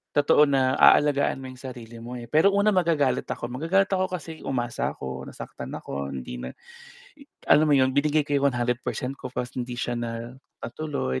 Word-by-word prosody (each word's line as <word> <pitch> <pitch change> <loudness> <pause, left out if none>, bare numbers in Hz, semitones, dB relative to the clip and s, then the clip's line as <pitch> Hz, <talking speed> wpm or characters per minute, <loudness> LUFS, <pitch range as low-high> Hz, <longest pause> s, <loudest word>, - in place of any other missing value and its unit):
totoo 145 0 +5
na 130 -1 +2
aalagaan 145 -2 +4
mo 130 - -8
yung 125 - -15
sarili 120 -3 -9
mo, 125 +1 -7
eh. 120 - -8
Pero 160 - +4
una, 200 +1 +3
magagalit 165 -7 +1
ako. 120 - -3
Magagalit 165 +10 +1
ako 185 0 -1
kasi 165 -3 -6
umasa 120 -3 -2
ako, 65 0 -6
nasaktan - - -8
ako, 70 0 -5
hindi 60 -1 -6
na 65 - -5
i - - -27 1.0
alam 155 +1 +5
mo 145 - +5
'yon, 130 0 +3
binigay 150 +1 +2
ko 145 - -4
yung 140 0 +3
100% 125 +2 -2
ko 130 - -6
'tas 125 0 -4
hindi 125 -1 -4
siya 120 - -2
na 115 0 -5 0.3
natuloy. 140 - -3
130 Hz, 185 wpm, -25 LUFS, 120-150 Hz, 1.0 s, totoo